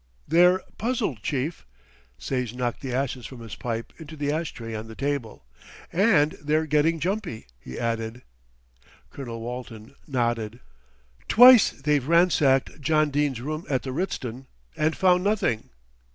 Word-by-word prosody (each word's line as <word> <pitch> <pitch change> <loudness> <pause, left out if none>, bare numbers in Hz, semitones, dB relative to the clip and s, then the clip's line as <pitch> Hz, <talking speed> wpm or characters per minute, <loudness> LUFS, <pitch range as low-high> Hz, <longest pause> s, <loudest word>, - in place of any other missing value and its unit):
"They're 180 +4 +5 0.2
puzzled, 220 - -1
chief" 140 - -3 0.5
Sage 125 -3 -3
knocked 125 -2 -2
the 130 - -5
ashes 125 -2 -2
from 130 -3 -11
his 115 -2 -9
pipe 115 -1 -4
into 160 -1 -9
the 145 0 -1
ash 160 +1 -2
tray 115 -2 -8
on 110 0 -5
the 110 - -10
table 140 - -3 0.5
"and 170 -6 +4
they're 155 +2 +1
getting 155 +2 +2
jumpy," 180 - -3
he 65 - -9
added. 115 +1 -3 0.9
Colonel 120 -4 -7
Walton 115 -2 -7
nodded. 120 -4 -1 0.7
"Twice 245 0 +8
they've 145 -1 -1
ransacked 155 -5 +3
John 155 +1 +2
Dene's 140 -4 0
room 155 +4 -4
at 130 -3 0
the 130 - -4
Ritzton 130 -6 -4 0.3
and 155 +1 0
found 180 -1 +4
nothing." 200 - 0
140 Hz, 140 wpm, -25 LUFS, 120-160 Hz, 0.9 s, Twice